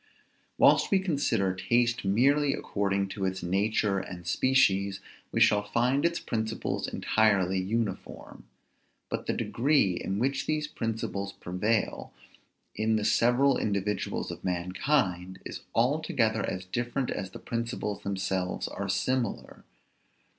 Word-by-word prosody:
Whilst - - +5
we 195 - +4
consider 140 - 0
taste 120 +6 +1
merely 135 +8 +3
according 100 -1 -1
to 95 - -5
its 95 -1 -2
nature 100 +2 +1
and 90 -2 -8
species, 100 -3 +2 0.3
we - - 0
shall 105 -1 +5
find 120 +7 +1
its 170 0 +1
principles 110 -1 -2
entirely 100 -4 +2
uniform; 105 +1 -4 0.6
but - - -4
the - - +1
degree 135 -6 +2
in 95 +2 -3
which 135 +4 -1
these 155 -1 0
principles 110 -7 -3
prevail, 105 +5 -1 0.6
in 110 +1 +1
the 105 -1 0
several 125 +5 +3
individuals 105 0 -2
of - - -9
mankind, 90 +1 -1
is - - -6 0.2
altogether 120 - +1
as 90 0 -5
different 120 +6 -2
as 95 -2 -4
the - - -9
principles 115 -3 -3
themselves 95 -2 -2
are - - -5
similar. 130 -4 -2
110 Hz, 125 wpm, -28 LUFS, 95-125 Hz, 0.6 s, Whilst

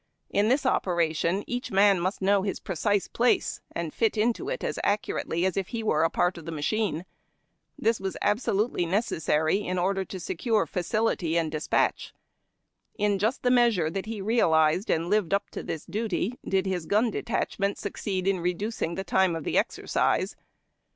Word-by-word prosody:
In 205 +1 +2
this 270 +3 +2
operation 170 -3 +1
each 245 +1 -4
man 195 -1 +4
must 185 +3 -2
know 200 0 +3
Ins 200 - -2
precise 195 +2 0
place, 240 +1 +1
and 170 -2 -4
fit 225 -1 +1
into 235 - 0
it - - -3
as - - -2
accurately 200 -4 0
as 190 - 0
if 195 -2 -1
he 230 -1 -4
were 155 -7 +2
a 165 - +3
part 175 +1 0
of 165 - -12
a - - -3
machine. 170 +2 -1 0.7
This 225 +1 +1
was 190 -1 -4
absolutely 205 -3 +1
necessary, 160 -4 +1
in 185 -3 -3
order 190 +2 +1
to 190 0 -7
secure 200 +4 0
facility 180 -1 0
and 160 -2 0
despatch. 155 0 0 0.8
In 205 -2 +1
]ust 225 +5 0
the 250 - +3
measure 230 -10 +3
that 195 +3 -4
he 220 -2 -4
realized 180 -4 +3
and 165 +1 +1
lived 200 -2 +2
up 200 - -3
to - - -5
this 160 - -5
duty, 220 +3 -2
did 190 -1 0
his 180 -4 -2
gun 220 +3 +2
detachment 200 -3 -1
succeed 190 -2 -3
in 195 -2 +2
reducing 180 0 -2
the 190 - -3
time 190 -2 +2
of 165 - -4
the - - -2
exercise. - - 0
195 Hz, 175 wpm, -27 LUFS, 170-215 Hz, 0.8 s, man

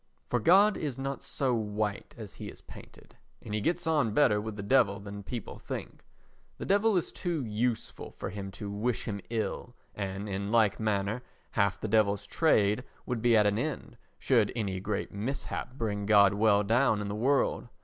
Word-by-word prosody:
For 125 - +2
God 195 - +5
is 140 -5 -3
not 135 +1 -4
so 130 -3 -1
white 105 -2 -2
as - - -9
he - - -8
is - - -12
painted, - - -14 0.3
and 105 - -8
he 105 - 0
gets 175 +8 0
on 150 -10 +1
better 105 -8 +4
with 110 0 -5
the 100 - -6
Devil 100 -3 +3
than 100 0 -8
people 115 +2 -6
think. - - -7 0.5
The - - -5
Devil 205 +1 +3
is 175 - -1
too 170 -7 -2
useful 115 +2 -2
for - - -6
him 100 0 -6
to 100 +2 -6
wish 110 +4 -1
him 100 -3 -4
ill 120 +1 -3 0.2
and, 100 0 -4
in 100 +1 -3
like 110 -3 +3
manner, 105 +1 0 0.3
half 100 -3 +1
the - - -3
Devil's 100 -2 +2
trade 105 -4 +2 0.2
would 125 -3 -2
be 115 -1 +5
at 105 - +4
an 105 +1 +2
end 140 -2 -4 0.2
should 115 -6 +2
any 100 -5 -2
great 100 +3 -3
mishap 125 +4 -4
bring 105 -5 -2
God 100 -2 +6
well 105 0 +3
down 115 +1 +3
in 100 - -3
the 100 - -3
world. 130 +4 +1
110 Hz, 190 wpm, -29 LUFS, 100-125 Hz, 0.5 s, God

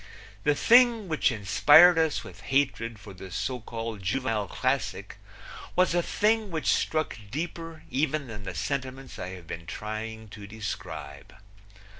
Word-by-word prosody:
The 150 - +4
thing 235 - +5
which 155 -4 +2
inspired 145 - +6
us 160 -2 +1
with - - -12
hatred 130 -5 0
for 100 0 -12
the 95 0 -10
so 125 +8 -3
called 115 -2 -6
juvenile 105 +1 -1
classic - - -2 0.6
was 180 -1 +3
a 175 - +3
thing 215 +4 +1
which 160 -3 +1
struck 155 -6 -1
deeper 165 +4 -5
even 150 +1 0
than 110 -4 -8
the 95 -3 -6
sentiments 130 -1 -4
I - - -4
have 90 -2 -10
been 85 +1 -7
trying 110 +3 -6
to 100 0 -10
describe. 90 -9 -7
125 Hz, 145 wpm, -27 LUFS, 105-160 Hz, 0.6 s, inspired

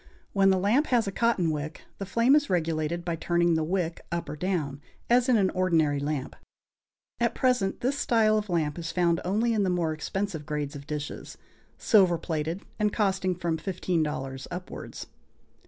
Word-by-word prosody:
When 195 -1 +4
the 190 - +4
lamp 220 +11 +2
has 240 -3 +2
a 195 - -2
cotton 195 -6 +1
wick, 150 0 -5 0.2
the 195 - -4
flame 235 +8 +4
is 295 -1 +2
regulated 165 -1 -1
by 170 -2 -1
turning 170 +1 +1
the 160 -1 +1
wick 170 0 -2
up 170 0 -3
or - - -4
down, 150 -5 -2 0.3
as 245 +1 +4
in 245 - +5
an 195 -3 +2
ordinary 165 -6 +2
lamp. 145 -2 -3 0.8
At - - +1
present 250 -7 +1
this 275 +3 0
style 220 -2 +3
of 210 -1 -1
lamp 160 -2 0
is 165 -1 -4
found 170 -2 +2
only 220 +6 +1
in 215 - +1
the 190 - +1
more 170 -3 0
expensive 160 0 -4
grades 150 -1 -3
of 140 0 -9
dishes, 150 -1 -5 0.4
silver 190 -6 +4
plated, 160 +3 -3 0.2
and 210 -1 +2
costing 190 -3 0
from 170 -2 -1
$15 155 -7 -2
upwards. 180 +1 -7
175 Hz, 175 wpm, -27 LUFS, 155-200 Hz, 0.8 s, in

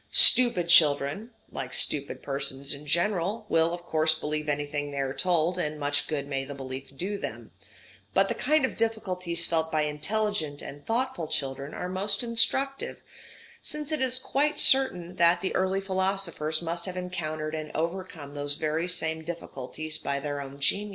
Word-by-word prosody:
Stupid 235 -9 +6
children, 155 +4 +4 0.2
like 125 -1 -4
stupid 140 -1 +1
persons 140 0 -1
in 145 +1 -9
general, 190 +6 0
will 165 0 +3
of 175 0 -6
course 160 -1 +2
believe 150 -1 -3
anything 145 0 -2
they 140 - -7
are 135 -1 -1
told, 175 +3 +1
and 150 -2 -3
much 145 0 +1
good 145 -3 -3
may 135 -1 -2
the 140 +1 -8
belief 135 0 -8
do 200 +5 -3
them; - - -7 0.6
but - - +4
the - - -1
kind 305 -2 +2
of - - -5
difficulties 180 -7 +4
felt 160 -1 +1
by 155 -1 +1
intelligent 155 0 -1
and 145 +1 -10
thoughtful 235 -7 -1
children 135 -1 -3
are 180 - -4
most 195 +4 -1
instructive, 265 +4 0 0.6
since 300 0 -6
it 305 -3 -1
is 255 -1 +1
quite 290 +3 0
certain 180 -10 +2
that 170 0 +5
the 190 - -2
early 190 +1 +1
philosophers 190 -5 -1
must 170 +2 -3
have 185 0 -6
encountered 155 -4 -4
and 155 -1 -5
overcome 165 -3 -4
those 145 0 +2
very 160 +3 -1
same 160 -3 -1
difficulties 155 -1 -5
by 140 0 -2
their 145 0 -4
own 140 0 -9
genius. 200 +9 +1
165 Hz, 170 wpm, -27 LUFS, 145-190 Hz, 0.6 s, Stupid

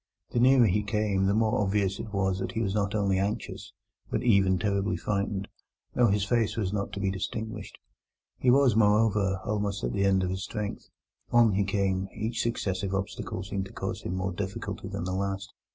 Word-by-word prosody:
The 120 - 0
nearer 130 0 +6
he 105 +1 +2
came 105 -2 0
the 100 - +2
more 110 -1 +2
obvious 100 -1 0
it 110 - -6
was 95 -2 0
that - - -3
he 110 - -1
was 95 -2 -1
not 100 0 0
only 100 -3 +2
anxious, 100 +2 -3 0.4
but - - -1
even 100 -5 +4
terribly 100 +2 0
frightened, 100 -1 -2 0.5
though 120 - +4
his 100 -1 +2
face 115 +1 +1
was 100 -3 -1
not 100 -1 -2
to - - -4
be 100 -1 0
distinguished. 105 +2 -5 0.6
He 125 - +2
was, 130 -3 +5
moreover, 105 -3 +3
almost 105 -4 -1
at - - -1
the 100 - +1
end 95 -1 +3
of 90 - -1
his 95 +1 -3
strength. 105 -2 -5 0.4
On 120 -2 +6
he 100 +1 +2
came; 95 -1 0
each 110 +2 -2
successive 100 -4 -1
obstacle 95 -1 -4
seemed 95 -1 -3
to 95 - -12
cause - - -4
him 90 - -3
more 95 0 -1
difficulty 95 +1 -5
than - - -4
the 90 +1 -2
last. 100 +1 -3
100 Hz, 200 wpm, -28 LUFS, 95-105 Hz, 0.6 s, nearer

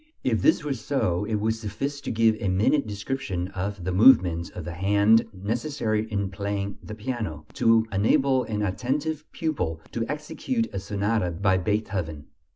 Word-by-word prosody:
If - - +1
this 315 - +4
were 145 -2 -1
so, 105 -7 -1
it 110 0 -1
would 110 +2 +1
suffice 135 +6 -4
to - - -5
give 115 -1 +3
a 100 - -1
minute 110 +9 +2
description 100 -4 -3
of 95 0 -4
the 95 - -1
movements 90 -5 +5
of 90 - -8
the 85 - -5
hand 100 +5 +4
necessary 110 +2 -2
in 100 -2 -1
playing 100 0 -3
the 110 - -8
piano, 105 - -4 0.2
to 115 -1 +5
enable 130 +6 +3
an 105 -1 -2
attentive 140 +10 -2
pupil 90 - -2
to 115 - -2
execute 230 - -2
a - - -2
sonata 100 0 0
by 95 +2 +1
Beethoven. 90 -6 -2
105 Hz, 160 wpm, -26 LUFS, 95-125 Hz, 0.2 s, movements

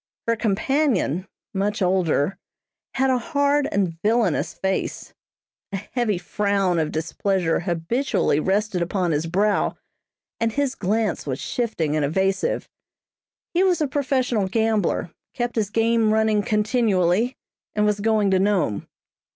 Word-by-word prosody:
Her 230 - +3
companion, 215 - 0 0.3
much 205 +2 -1
older, 180 -3 +1 0.6
had 265 0 +2
a 255 - +2
hard 285 -1 +1
and 175 -5 -1
villainous 215 -5 +1
face. 190 0 -3 0.6
A - - -3
heavy 210 0 -1
frown 195 -1 0
of 155 -1 -1
displeasure 170 +2 0
habitually 175 - 0
rested 195 +1 0
upon 175 0 0
his 155 +2 0
brow, 200 +4 +1 0.6
and 230 -1 0
his 280 0 0
glance 210 - -1
was 135 0 -2
shifting 175 -11 -1
and 155 - +1
evasive. 190 +6 0 0.9
He 355 +2 +3
was 365 -3 +3
a 305 - +1
professional 255 -6 0
gambler, 215 -4 0 0.2
kept 240 -1 -2
his 215 -3 0
game 225 0 +2
running 220 -1 +3
continually, 210 0 +1 0.4
and 210 0 +2
was 210 -1 +1
going 215 -2 +2
to 190 - +3
Nome. 190 - +1
205 Hz, 130 wpm, -23 LUFS, 180-230 Hz, 0.9 s, Her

